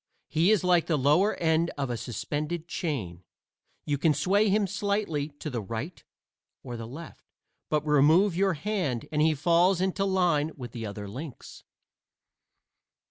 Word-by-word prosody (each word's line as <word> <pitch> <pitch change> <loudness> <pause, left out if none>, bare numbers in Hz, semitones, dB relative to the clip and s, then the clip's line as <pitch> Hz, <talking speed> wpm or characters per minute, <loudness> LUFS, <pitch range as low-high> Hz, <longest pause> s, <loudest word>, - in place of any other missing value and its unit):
He 165 +4 +2
is 215 -5 +3
like 180 -2 +3
the 160 - +1
lower 150 +10 +3
end 165 0 +1
of 135 -3 -2
a - - -1
suspended 150 +8 -4
chain; 110 - -4 0.6
you 145 -2 -1
can 155 -1 +3
sway 200 +8 +2
him 205 +1 +2
slightly 200 -6 -1
to - - -7
the 125 -6 -3
right 115 - -6 0.6
or 120 -2 -6
the 115 -1 -6
left, 155 +7 -11 0.4
but 150 0 0
remove 155 +6 +4
your 190 +1 +2
hand 170 - -2
and 150 -1 +1
he 155 0 +3
falls 170 +5 +3
into 190 +1 0
line 175 -5 +1
with 125 -3 -7
the 115 -2 -5
other 100 0 -7
links. 130 +6 -9
155 Hz, 155 wpm, -27 LUFS, 135-180 Hz, 0.6 s, remove